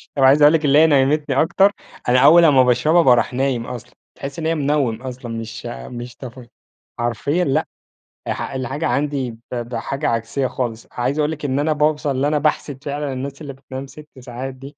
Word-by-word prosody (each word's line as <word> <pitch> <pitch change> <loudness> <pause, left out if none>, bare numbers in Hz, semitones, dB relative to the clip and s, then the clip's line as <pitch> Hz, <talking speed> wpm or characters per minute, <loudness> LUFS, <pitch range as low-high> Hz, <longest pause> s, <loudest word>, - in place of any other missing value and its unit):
طب 135 - +1
عايز 140 +3 +6
اقول 150 +2 +7
لكِ 160 -2 +1
اللي 145 +2 +5
هي 160 - +6
نيّمتني 140 0 +2
أكتر. 190 +5 +3 0.4
أنا 125 +1 +5
أول 160 +5 +7
أما 135 -4 +6
باشربها، 125 +8 +3
باروح 125 -4 +3
نايم 130 -2 -1
أصلًا. 125 -3 -8 0.2
تحسّي 140 +4 -7
إن - - -4
هي 165 - +1
منوّم 140 -6 0
أصلًا، 125 -2 -7
مش 115 +1 -8
مش 120 - -7
تف 125 -1 -10 0.5
حرفيًا 130 - 0
لأ، 135 - 0 0.6
اح - - -3
الحاجة 135 +4 -3
عندي 140 -4 -1
ب 115 +2 -10
بحاجة 125 +4 -3
عكسية 115 +4 -1
خالص. 115 -3 -4
عايز 130 +5 -2
اقول 150 +1 +1
لِك 150 -2 -6
إن 135 +1 0
أنا 155 +1 +1
باوصل 150 -1 +1
اللي 135 +2 0
أنا 150 0 +1
باحسد 145 -2 -1
فعلًا 145 -1 -3
الناس 140 +3 -6
اللي 140 -2 -7
بتنام 135 0 -8
6 150 +2 -13
ساعات 130 +1 -7
دي. 135 +2 -12
135 Hz, 195 wpm, -20 LUFS, 125-150 Hz, 0.6 s, اقول